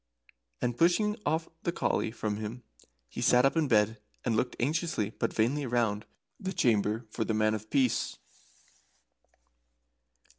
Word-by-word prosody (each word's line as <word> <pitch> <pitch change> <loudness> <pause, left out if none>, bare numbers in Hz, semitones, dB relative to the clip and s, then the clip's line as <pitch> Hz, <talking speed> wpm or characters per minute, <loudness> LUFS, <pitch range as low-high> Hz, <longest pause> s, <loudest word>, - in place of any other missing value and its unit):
And 120 -1 0
pushing 180 - +3 0.5
the 170 - -1
collie 170 - 0
from 110 -2 -3
him, 110 +3 -6 0.4
he - - -6
sat 125 +1 +5
up 135 - +3
in 160 -2 +2
bed 110 -2 +2 0.2
and 115 -3 +1
looked 125 +3 0
anxiously 145 - 0
but - - -2
vainly 130 +6 +1
round 115 -4 0 0.3
the 190 0 -3
chamber 110 - +1
for 115 - -1
the 110 - -1
Man 110 0 +2
of 110 0 -5
Peace. 130 -4 +1
120 Hz, 140 wpm, -30 LUFS, 110-135 Hz, 0.5 s, sat